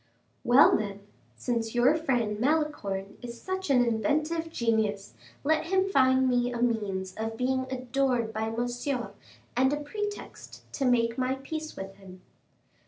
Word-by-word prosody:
"Well, 255 Hz, +5 st, +7 dB
then, 200 Hz, -1 st, -3 dB, 0.3 s
since 230 Hz, -, -2 dB
your 245 Hz, +4 st, +5 dB
friend 245 Hz, -9 st, 0 dB
Malicorne 235 Hz, -9 st, -1 dB
is 235 Hz, -1 st, -8 dB
such 375 Hz, -1 st, -4 dB
an 250 Hz, -3 st, +5 dB
inventive 305 Hz, +8 st, 0 dB
genius, 220 Hz, -6 st, 0 dB, 0.3 s
let 315 Hz, +2 st, +1 dB
him 380 Hz, +1 st, +2 dB
find 260 Hz, -3 st, +4 dB
me 245 Hz, -1 st, +2 dB
a 240 Hz, -, -4 dB
means 205 Hz, -6 st, -1 dB
of 225 Hz, 0 st, -3 dB
being 260 Hz, +1 st, 0 dB
adored 255 Hz, -2 st, 0 dB
by 220 Hz, +1 st, -1 dB
Monsieur, 245 Hz, +2 st, -2 dB, 0.4 s
and 260 Hz, +2 st, +3 dB
a 295 Hz, -, 0 dB
pretext 410 Hz, +8 st, -6 dB
to 275 Hz, -, -1 dB
make 235 Hz, -1 st, +2 dB
my 255 Hz, +1 st, +1 dB
peace 310 Hz, +3 st, -6 dB
with 195 Hz, 0 st, -8 dB
him." 185 Hz, -2 st, -13 dB
245 Hz, 145 wpm, -28 LUFS, 225-280 Hz, 0.4 s, Well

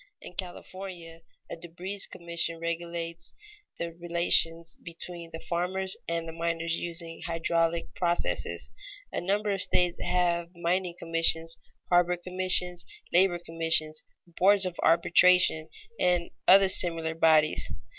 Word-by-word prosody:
In -, -, -12 dB
California, 180 Hz, -2 st, -7 dB, 0.3 s
a -, -, -7 dB
debris 175 Hz, +4 st, -8 dB
commission 170 Hz, -1 st, -4 dB
regulates 170 Hz, 0 st, -5 dB, 0.4 s
the 170 Hz, -1 st, -5 dB
relations 170 Hz, -1 st, +1 dB
between 170 Hz, 0 st, -8 dB
the 160 Hz, -, -7 dB
farmers 185 Hz, +3 st, -1 dB
and 165 Hz, 0 st, -3 dB
the 165 Hz, -, -7 dB
miners 165 Hz, 0 st, -2 dB
using 170 Hz, -1 st, -5 dB
hydraulic 165 Hz, 0 st, -1 dB
processes. 175 Hz, -1 st, -1 dB, 0.4 s
A -, -, -3 dB
number 205 Hz, +3 st, -1 dB
of 195 Hz, -1 st, -1 dB
states 180 Hz, -2 st, +1 dB
have 175 Hz, -1 st, 0 dB
mining 175 Hz, +1 st, -1 dB
commissions, 165 Hz, 0 st, 0 dB, 0.3 s
harbor 175 Hz, 0 st, +3 dB
commissions, 180 Hz, -1 st, +3 dB, 0.3 s
labor 180 Hz, 0 st, +4 dB
commissions, 165 Hz, -2 st, 0 dB, 0.2 s
boards 190 Hz, +3 st, +4 dB
of 180 Hz, -2 st, -5 dB
arbitration, 170 Hz, -1 st, +4 dB, 0.3 s
and 175 Hz, -1 st, +1 dB, 0.2 s
other 195 Hz, +1 st, +7 dB
similar 165 Hz, -3 st, +2 dB
bodies. 160 Hz, -2 st, +3 dB
170 Hz, 115 wpm, -28 LUFS, 165-180 Hz, 0.4 s, other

